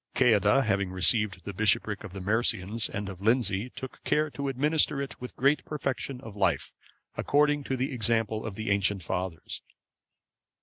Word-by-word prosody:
Ceadda 125 +2 +4
having 100 -3 0
received 95 +1 +2
the 100 - -5
bishopric 105 +1 0
of 105 - -8
the 95 0 -7
Mercians 110 +1 +1
and 100 0 -4
of 95 -1 -8
Lindsey,(545) 115 0 +1
took 130 - -9
care 150 0 +1
to 140 0 -4
administer 145 +2 +2
it 140 -2 -6
with 125 - -7
great 140 +2 +2
perfection 135 -3 -4
of 115 -6 -10
life, 100 -2 0 0.4
according 145 0 +2
to 130 - -2
the 130 +2 -2
example 110 -2 0
of 105 -3 -5
the 110 -1 -2
ancient 100 -1 +1
fathers. 90 -1 -4
110 Hz, 165 wpm, -28 LUFS, 100-135 Hz, 0.4 s, Ceadda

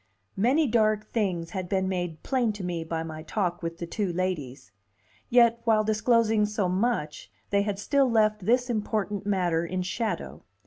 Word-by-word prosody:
Many 255 +10 +3
dark 215 -3 +1
things 185 -7 -1
had 185 -3 -4
been 190 -1 0
made 175 -4 -3
plain 245 -5 +1
to 205 -2 -7
me 175 -2 -3
by 160 0 -3
my 155 -1 -7
talk 175 +1 -2
with 165 0 -4
the 170 - -5
two 195 +2 -2
ladies; 165 - -3 0.6
yet 235 -1 +4
while 220 -2 +3
disclosing 220 0 +2
so 210 -2 -1
much, 185 -5 -1 0.2
they 200 0 +3
had 205 -1 -2
still 270 +6 +2
left 215 -3 +2
this 250 +2 +3
important 210 -3 -2
matter 175 -5 +1
in 185 +2 -2
shadow. 220 +5 -3
205 Hz, 170 wpm, -27 LUFS, 175-225 Hz, 0.6 s, yet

